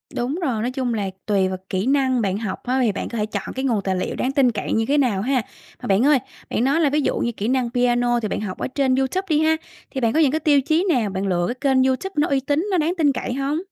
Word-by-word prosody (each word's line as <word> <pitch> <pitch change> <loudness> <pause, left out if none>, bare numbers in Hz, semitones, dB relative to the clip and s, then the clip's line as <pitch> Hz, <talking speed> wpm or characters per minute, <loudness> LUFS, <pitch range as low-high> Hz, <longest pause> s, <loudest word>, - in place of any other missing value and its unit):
Đúng 250 +5 -1
rồi, 245 -10 -1
nói 245 +3 -1
chung 255 -2 -2
là 205 -3 -2 0.2
tùy 195 -3 +2
vào 185 0 -3
kỹ 190 +3 -1
năng 260 -3 +2
bạn 195 -1 0
học 210 -3 -5
á 255 +2 0
thì 235 -4 +3
bạn 200 - -5
có 235 - -5
thể 210 - 0
chọn 205 -2 -5
cái 265 +1 -2
nguồn 230 -6 +1
tài 190 -1 0
liệu 185 - -2
đáng 260 - -1
tin 270 -3 +3
cậy 210 - -3
như 225 0 +1
thế 290 - +2
nào 235 -9 +2
ha. 255 +2 +1 0.4
Mà - - -5
bạn 200 +5 +3
ơi, 290 -2 +5 0.3
bạn - - 0
nói 280 +6 +2
là 300 - +3
ví 300 +2 +1
dụ - - 0
như 235 - 0
kỹ 215 -2 -4
năng 255 -1 +1
piano 245 0 +2
thì 220 - -2
bạn - - -3
học 195 -3 -5
ở - - -3
trên 265 -1 +1
Youtube 270 +9 -1
đi 305 -2 +3
ha, 315 0 +3 0.4
thì 265 - -3
bạn 230 -1 +2
có - - +2
những 295 -5 +4
cái 315 - 0
tiêu 290 -2 +3
chí 320 +6 +1
nào 240 -10 +2
bạn 190 +1 -3
lựa 175 -2 +1
cái 245 - -3 0.2
kênh 260 0 +4
Youtube 265 +9 -1
nó 295 - +3
uy 275 -1 +1
tín, 290 +7 -1
nó 370 - +2
đáng 325 +1 +1
tin 300 -4 +3
cậy 255 - -3
hông? 275 +3 -1
255 Hz, 300 wpm, -22 LUFS, 220-280 Hz, 0.4 s, ơi